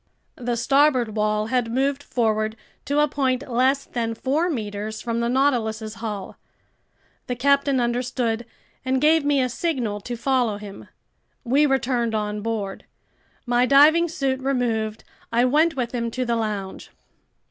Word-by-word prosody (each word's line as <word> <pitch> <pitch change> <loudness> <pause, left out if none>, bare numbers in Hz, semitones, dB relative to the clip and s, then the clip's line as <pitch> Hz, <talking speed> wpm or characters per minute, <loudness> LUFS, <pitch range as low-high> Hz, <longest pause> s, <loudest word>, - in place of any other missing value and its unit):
The 240 -2 -2
starboard 265 -3 +2
wall 215 0 +1
had 245 -3 +1
moved 275 +3 0
forward 220 -4 0 0.3
to 285 +2 +2
a 300 - +4
point 265 -2 -1
less 260 +3 +1
than 230 -2 -3
four 295 +9 0
meters 215 -5 -4
from 230 -1 -2
the 235 0 0
Nautilus's 230 -5 0
hull. 210 -4 -5 0.9
The 250 - -2
captain 280 +1 +2
understood 240 -1 -1 0.4
and 260 0 +1
gave 310 +2 +4
me 285 -1 +2
a - - +1
signal 245 -6 -2
to 240 +4 -5
follow 245 -4 +1
him. 205 -1 -10 0.6
We 275 +4 +3
returned 245 -4 0
on 210 0 -2
board. 210 -3 -4 0.6
My 245 0 +2
diving 305 +5 +6
suit 275 -5 -1
removed, 235 -5 -1 0.3
I 240 +2 +3
went 310 +5 +3
with 245 -3 -2
him 235 -1 -1
to 255 +2 -3
the 235 -1 0
lounge. 210 -4 -4
245 Hz, 145 wpm, -23 LUFS, 220-275 Hz, 0.9 s, diving